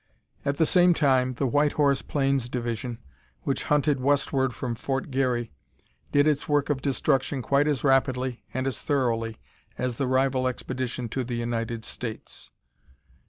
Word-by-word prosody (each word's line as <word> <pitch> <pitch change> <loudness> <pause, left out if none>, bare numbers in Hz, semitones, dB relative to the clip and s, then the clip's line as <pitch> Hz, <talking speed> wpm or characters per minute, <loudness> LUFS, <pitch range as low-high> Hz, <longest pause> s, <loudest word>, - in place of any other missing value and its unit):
At 140 0 -1
the 160 - +4
same 180 0 +5
time, 130 -4 +2
the 135 - -1
White 145 +4 +2
Horse 140 -2 +2
Plains 135 -3 0
division, 120 -1 -3 0.5
which - - -1
hunted 150 -1 +2
westward 135 -1 +1
from 125 0 -4
Fort 135 +4 -3
Garry, 125 -3 0 0.6
did 145 +1 +4
its 150 -1 +1
work 145 0 +2
of 135 -2 -1
destruction 135 -1 0
quite 140 +4 +2
as 145 -3 0
rapidly 130 -2 +1
and 130 +1 -2
as 135 - -2
thoroughly 115 -6 0 0.4
as 125 -2 -2
the 135 - 0
rival 130 0 +2
expedition 125 -1 -3
to 130 +3 -2
the 120 0 -4
United 115 -1 -3
States. 115 -3 -7
130 Hz, 155 wpm, -26 LUFS, 125-140 Hz, 0.6 s, same